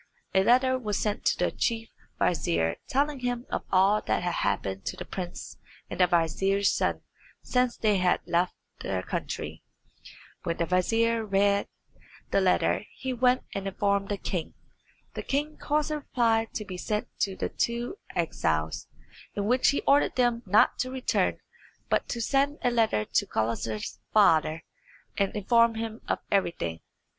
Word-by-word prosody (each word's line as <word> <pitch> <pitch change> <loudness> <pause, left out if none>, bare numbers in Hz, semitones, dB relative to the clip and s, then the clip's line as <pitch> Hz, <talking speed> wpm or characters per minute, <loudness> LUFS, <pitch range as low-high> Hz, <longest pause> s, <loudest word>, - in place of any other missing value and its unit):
A 190 0 +4
letter 255 +3 +4
was 210 -4 -2
sent 210 -1 -2
to - - +3
the - - +1
chief 225 -1 -1 0.3
vizier 85 - +1
telling 285 +1 0
him 245 0 -2
of - - -2
all 195 +3 +4
that - - -1
had 175 -1 -1
happened 95 -1 -1
to - - -3
the - - -6
prince 180 -2 -7 0.3
and - - -5
the 180 - +6
vizier's 190 +4 +2
son - - 0 0.4
since 250 -1 +1
they 210 -2 +2
had 180 -1 +2
left 175 +1 +1 0.2
their 95 -1 -2
country. - - -4 0.8
When 170 - -2
the 170 - +1
vizier 225 +6 +2
read 200 0 +2 0.6
the 195 - +3
letter 185 +2 +2
he 260 -1 -3
went 250 +1 +3
and 195 0 -3
informed 200 0 0
the 205 - -1
king. 180 -4 -4 0.6
The - - -4
king 295 +2 -2
caused 300 +1 0
a 305 - 0
reply 230 -5 +1
to 215 - -3
be 185 -2 -6
sent 210 +3 -2
to 195 -2 0
the - - -2
two 240 - -2 0.2
exiles, 80 - -1 0.5
in 200 - -1
which 250 +4 +3
he 280 - +1
ordered 285 +1 +3
them 240 -2 +2
not 205 +3 +4
to 255 - -1
return, 260 0 0 0.5
but - - +1
to 235 - -2
send 280 +5 +1
a 245 - +3
letter 220 - +2
to - - +1
Gulizar's 110 -1 -2
father, 160 -6 +4 0.5
and 200 0 0
inform 230 +2 +3
him 225 0 -5
of - - +1
everything. 125 - 0
205 Hz, 160 wpm, -28 LUFS, 180-245 Hz, 0.8 s, the